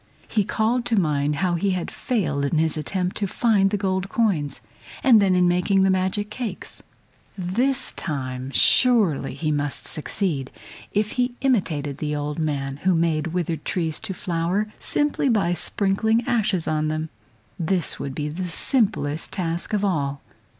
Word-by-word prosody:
He 215 - +1
called 230 +5 0
to 230 -3 +2
mind 150 -3 +1
how 180 - +1
he 175 +4 0
had 175 - -4
failed 155 - -1
in 140 +3 0
his 160 0 +2
attempt 180 +4 -2
to 200 - 0
find 200 -2 +2
the 205 - 0
gold 190 -1 -1
coins, 170 - 0 0.4
and 235 -5 +7
then 190 -2 +3
in 180 0 +4
making 180 +2 +2
the 190 - +4
magic 190 +3 -1
cakes; 230 -7 -6 0.6
this 245 +9 0
time 130 -5 -4
surely 200 - +3
he 155 -2 -1
must 145 -1 -1
succeed 155 -4 -1 0.4
if 210 +1 0
he 245 -1 -1
imitated 160 - 0
the 150 -1 -2
old 145 +1 -3
man, 140 -3 -2
who 185 +4 +2
made 165 -1 +1
withered 170 -2 -2
trees 160 -4 -2
to 190 - -5
flower 180 +4 -1
simply 295 -2 +1
by 200 -7 +2
sprinkling 215 +6 +1
ashes 210 -7 +1
on 155 0 0
them. 155 +1 -2 0.5
This 175 0 0
would 135 -1 -5
be 150 -1 -2
the 175 +5 -4
simplest 175 - +1
task 170 -2 -2
of 205 -1 +1
all. 140 -7 -1
180 Hz, 160 wpm, -23 LUFS, 155-205 Hz, 0.6 s, and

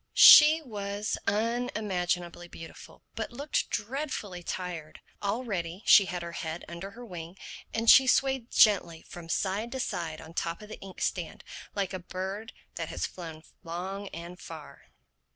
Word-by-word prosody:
She 310 +2 +10
was 205 -4 -3
unimaginably 200 -6 -1
beautiful 165 -1 -12
but 225 +1 -4
looked 280 +5 -2
dreadfully 215 -5 -3
tired. 170 -3 -5 0.2
Already 200 -4 -3
she 200 - +8
had 180 -1 -4
her 170 - -6
head 165 0 -5
under 170 +3 -7
her 245 - -8
wing; 175 -3 -8 0.3
and 225 +1 -2
she 265 +3 +9
swayed 265 -2 +2
gently 185 -6 +4
from 170 -1 -10
side 200 +7 -1
to 265 - -3
side 165 -9 -3
on 160 +1 -11
top 170 +4 -3
of 210 - -12
the 220 - -8
ink 195 -1 -10
stand - - -2 0.3
like 200 -2 -1
a 185 - -3
bird 190 +5 -5 0.3
that - - -3
has - - -2
flown 160 -3 -8 0.2
long 190 +4 -5
and 170 +1 -8
far. 155 -5 -11
190 Hz, 150 wpm, -29 LUFS, 170-220 Hz, 0.3 s, She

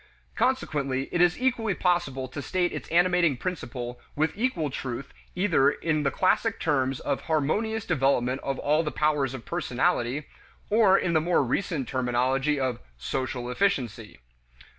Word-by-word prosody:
Consequently, 140 - 0
it 175 - +1
is 175 +3 +3
equally 235 -6 +1
possible 175 -8 0
to 135 +3 -6
state 180 +3 0
its - - -6
animating 175 -4 +3
principle 120 -7 -5 0.2
with 155 +2 +1
equal 200 - -1
truth 130 0 -5 0.2
either 175 -7 +3
in 155 +1 -1
the 140 - +2
classic 190 - +1
terms 135 -4 0
of - - -2
"harmonious 210 +9 0
development 130 - +1
of 135 -1 -2
all 150 +2 +2
the 155 - -2
powers 150 -4 0
of 115 - -9
personality" 130 +5 0 0.5
or 205 -3 +5
in 175 - 0
the 160 - +3
more 170 -2 +2
recent 135 0 -1
terminology 130 +3 +1
of 130 -3 -1 0.2
"social 125 - -3
efficiency." 125 - -1
150 Hz, 145 wpm, -27 LUFS, 130-180 Hz, 0.5 s, or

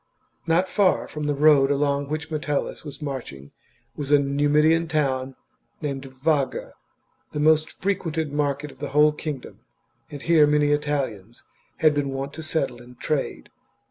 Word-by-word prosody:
Not 170 +3 +3
far 195 -1 +2
from 150 -1 -5
the 145 - +1
road 145 -2 +5
along 140 0 +1
which 155 +1 -4
Metellus 150 -2 -2
was 145 -2 -8
chap. 150 - -10
marching 120 - -6 0.4
was 145 -1 -5
a 145 - +8
Numidian 145 +4 +2
town 135 -4 -1 0.4
named 140 -3 -4
Vaga, 135 +1 -1 0.6
the 150 - -3
most 155 +1 +4
frequented 165 -6 -2
market 145 0 -1
of 130 - -19
the 145 -1 -4
whole 150 0 +6
kingdom; 150 -3 -6 0.5
and 145 - -7
here 160 -3 +5
many 150 0 +3
Italians 135 -8 -2 0.4
had 155 -1 +5
been 145 -1 -1
wont 135 +1 -4
to 160 - -7
settle 155 -6 -2
and 125 +1 -15
trade. 140 - -2
145 Hz, 155 wpm, -24 LUFS, 140-155 Hz, 0.6 s, a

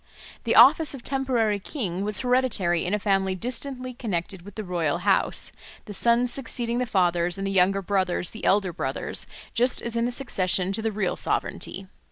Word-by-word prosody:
The 230 - +1
office 285 +5 +7
of 250 - -11
temporary 245 -6 0
king 195 - -4
was 210 -1 +2
hereditary 245 -10 +1
in 185 +4 0
a - - +1
family 195 -2 0
distantly 255 +4 -4
connected 190 -6 -3
with 200 +2 -13
the 215 - -4
royal 175 -5 -1
house, - - +2 0.3
the 210 - -8
sons 235 +4 +2
succeeding 240 -3 -3
the 250 - -1
fathers 175 -3 +1
and 195 - -3
the 195 - -1
younger 195 +1 +2
brothers 185 -2 0
the 220 - -10
elder 195 -3 +2
brothers 175 - -3 0.3
just 245 +2 +1
as 235 0 -4
in 230 0 +1
the 245 - -1
succession 190 -7 -1
to 220 - -2
the 225 0 -1
real 200 -3 -1
sovereignty. 195 - -3
210 Hz, 185 wpm, -25 LUFS, 185-245 Hz, 0.3 s, office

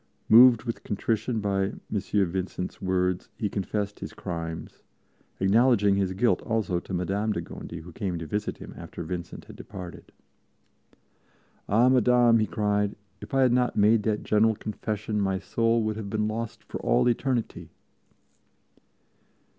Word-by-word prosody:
Moved 120 0 +8
with 115 -2 -5
contrition 110 +2 -1
by 100 -1 +1
M. - - -14
Vincent's 95 -3 -2
words, 90 -1 0
he 105 - -1
confessed 100 +1 -3
his - - -7
crimes, 85 -3 -6 0.6
acknowledging 105 +1 +4
his 95 -1 0
guilt 115 +6 +2
also 110 -6 -1
to 85 - -12
Madame 100 +4 -1
de - - -2
Gondi, 85 - -8
who 90 +2 -11
came 90 0 -3
to 80 - -6
visit 105 +6 -3
him - - -10
after - - -8
Vincent 90 -2 -6
had - - -12
departed. 90 -2 -10 1.6
"Ah 115 +5 +4
Madame," 125 -2 +5
he 110 - +1
cried, 105 -1 0 0.3
"if - - -6
I 135 - +4
had 125 -2 +4
not 125 0 +1
made 105 +2 +4
that 105 0 -1
General 110 +1 +3
Confession 105 0 -3
my 95 -1 0
soul 115 +4 +1
would 110 0 -2
have 105 -2 -5
been 105 +1 0
lost 110 +1 -4
for - - -7
all - - +3
eternity!" 120 -1 -1
105 Hz, 150 wpm, -27 LUFS, 95-115 Hz, 1.6 s, Moved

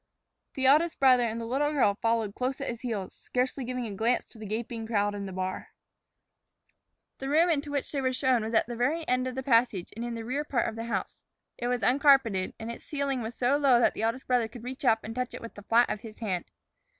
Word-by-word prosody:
The 265 -2 -1
eldest 310 +5 +4
brother 255 -3 +5
and 225 +1 -3
the 230 - -4
little 275 +5 0
girl 245 -8 +3
followed 225 -3 +1
close 255 +5 -2
at 275 - -3
his 235 -1 -5
heels, 215 -7 -4
scarcely 255 +2 -2
giving 250 0 -3
a 215 - -5
glance 225 +5 +1
to 225 - -14
the 215 - -7
gaping 225 +1 -4
crowd 205 -2 +1
in 200 -1 -5
the - - -6
bar. 185 0 -4 1.4
The 270 - -4
room 330 +4 +4
into 295 -2 -1
which 285 -2 -2
they 280 - -1
were 260 -1 +1
shown 255 -3 +2
was 225 +1 -3
at - - +4
the 240 - -6
very 300 +7 0
end 255 +1 +1
of 255 - -4
the 265 - -3
passage 230 -8 +2
and 230 - -5
in 240 -1 -3
the 225 -1 -6
rear 270 +5 -1
part 265 -5 0
of 225 - -4
the 225 0 -5
house. 235 - -4 0.4
It 240 - -2
was 245 -2 -1
uncarpeted, 255 -6 +4
and 225 +1 -5
its 235 - -10
ceiling 280 -3 -2
was 225 +1 -5
so 260 +3 +2
low 270 -4 +5
that 240 - +3
the - - -5
eldest 230 +4 -1
brother 245 -3 +2
could 230 0 -11
reach 260 +4 -7
up 225 -2 +3
and 225 - -6
touch 250 +1 -3
it - - -8
with 230 - -8
the 205 - -11
flat 230 +4 +4
of 215 - -3
his 220 -2 -10
hand. 190 -6 -2
240 Hz, 250 wpm, -28 LUFS, 225-265 Hz, 1.4 s, brother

